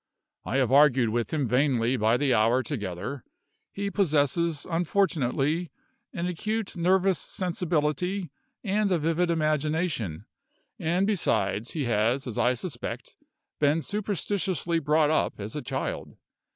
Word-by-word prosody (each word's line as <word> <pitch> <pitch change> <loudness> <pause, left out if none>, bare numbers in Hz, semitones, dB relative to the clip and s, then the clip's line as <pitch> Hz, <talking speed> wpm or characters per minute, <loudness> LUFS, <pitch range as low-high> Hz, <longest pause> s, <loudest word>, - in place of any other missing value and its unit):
I 130 - -1
have 130 -2 +2
argued 135 -4 +5
with 120 +1 -1
him 145 -5 0
vainly 125 -1 +2
by 110 0 +2
the 140 -2 +2
hour 115 +4 +3
together. 105 - -5 0.5
He 200 0 -3
possesses, 160 -3 +1
unfortunately, 165 -3 0 0.4
an 175 -5 -3
acute 215 +4 -3
nervous 185 0 +2
sensibility 180 -1 -1 0.3
and 205 -1 +1
a 180 - +3
vivid 165 +2 +1
imagination; 155 - -1 0.5
and 175 +4 +1
besides, 110 - 0
he 155 - -1
has, 120 +3 +1
as 120 -4 -4
I 125 +1 +3
suspect, 130 -1 -6 0.4
been 150 +2 +3
superstitiously 190 -3 -1
brought 155 0 +2
up 155 - 0
as 105 +2 -6
a 150 - -3
child. 125 - -4
155 Hz, 125 wpm, -27 LUFS, 125-180 Hz, 0.5 s, argued